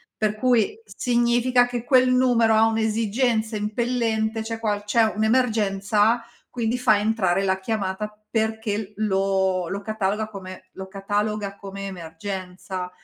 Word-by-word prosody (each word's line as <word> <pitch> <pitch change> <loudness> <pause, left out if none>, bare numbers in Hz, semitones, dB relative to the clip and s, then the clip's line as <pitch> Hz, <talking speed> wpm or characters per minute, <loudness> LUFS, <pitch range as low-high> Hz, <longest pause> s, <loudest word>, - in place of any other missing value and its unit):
Per 215 -1 0
cui 255 - +1
significa 245 - +2
che 245 -1 -4
quel 255 0 +4
numero 245 -3 +4
ha 220 +1 +5
un'esigenza 225 +1 0
impellente, 225 0 -1
c'è 225 0 -5
qual 210 -2 -1
c'è 225 +2 +3
un'emergenza, 220 -1 +2 0.3
quindi 235 0 -1
fa 240 -4 +4
entrare 200 -4 +1
la 190 -1 +1
chiamata 205 0 -2 0.2
perché 220 -2 -2
lo 190 -3 +1
lo 200 +3 -4
cataloga 215 0 -1
come 185 -2 -10
lo 190 0 -8
cataloga 205 +1 -2
come 195 0 -7
emergenza; 185 +1 -6
215 Hz, 125 wpm, -24 LUFS, 195-230 Hz, 0.3 s, ha